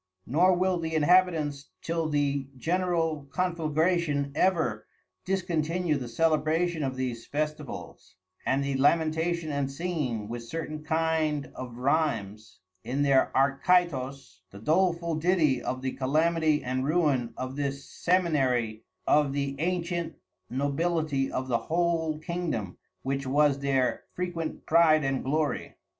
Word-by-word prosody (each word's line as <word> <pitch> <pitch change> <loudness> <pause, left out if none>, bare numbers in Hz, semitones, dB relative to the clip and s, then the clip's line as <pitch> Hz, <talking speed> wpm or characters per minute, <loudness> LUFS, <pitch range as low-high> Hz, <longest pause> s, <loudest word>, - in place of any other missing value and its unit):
Nor 180 +8 +4
will 185 0 +1
the 160 -1 -3
Inhabitants 155 -3 +2
till 165 -1 -1
the 140 -2 0
General 165 -2 0
conflagration 165 -3 0
ever 170 +1 +1 0.4
discontinue 175 -3 0
the 130 -3 -4
Celebration 160 +5 +1
of 135 -2 -2
these 125 -3 -4
Festivals, 150 -1 -5 0.3
and 135 +1 +1
the 140 0 -1
Lamentation 160 +3 +1
and 140 -1 -1
Singing 135 -9 -2
with 120 +2 -5
certain 155 +3 -5
kind 160 -2 0
of 125 -2 -7
Rhythmes 115 - -1 0.3
in 135 +3 -1
their 140 -2 +3
Arcytos, 135 - +1
the 100 - -12
doleful 170 - +1
ditty 155 -7 +2
of 130 +1 -4
the 130 - -1
Calamity 155 +3 +1
and 130 +1 -1
Ruin 145 -6 +1
of 130 +1 -4
this 140 -1 -3
Seminary 130 -11 +1 0.2
of 145 -2 +3
the 140 -1 -2
antient 170 0 -2 0.3
Nobility 145 +1 0
of 130 0 -3
the 120 -2 +1
whole 165 -2 0
Kingdom, 155 - -3 0.3
which 135 0 -2
was 145 0 +3
their 135 -2 0
frequent 175 -3 -4
Pride 155 -2 +5
and 135 -1 -1
Glory. 150 +2 -1
150 Hz, 125 wpm, -28 LUFS, 135-170 Hz, 0.4 s, Pride